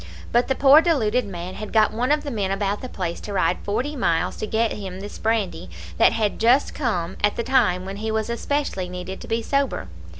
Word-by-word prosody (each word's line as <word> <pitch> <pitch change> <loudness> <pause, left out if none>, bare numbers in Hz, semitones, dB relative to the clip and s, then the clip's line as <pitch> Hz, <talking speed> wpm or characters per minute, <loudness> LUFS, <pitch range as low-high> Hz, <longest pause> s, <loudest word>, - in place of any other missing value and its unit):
But 240 +1 +3
the 265 - +1
poor 280 +3 +7
deluded 250 -9 +1
man 180 -1 -6
had 215 +1 -7
got 215 -1 +3
one 245 +5 0
of 300 0 +2
the 285 - -4
men 205 -5 -1
about 195 +1 -1
the 255 - -6
place 175 -6 -4
to 205 - -7
ride 180 -2 +1
forty 255 +9 -2
miles 170 - 0
to 215 - -4
get 225 +1 +1
him 190 -2 -6
this 205 +1 -8
brandy 220 - -1 0.3
that - - +6
had 215 -3 -1
just 245 +5 +3
come 190 - -2
at 205 - +3
the 235 - -2
time 185 -8 +2
when 195 +1 -6
he 220 +2 -3
was 220 -1 -1
especially 235 -5 -2
needed 180 +1 -6
to - - -9
be 225 0 -1
sober. 275 - -1
215 Hz, 225 wpm, -23 LUFS, 190-250 Hz, 0.3 s, poor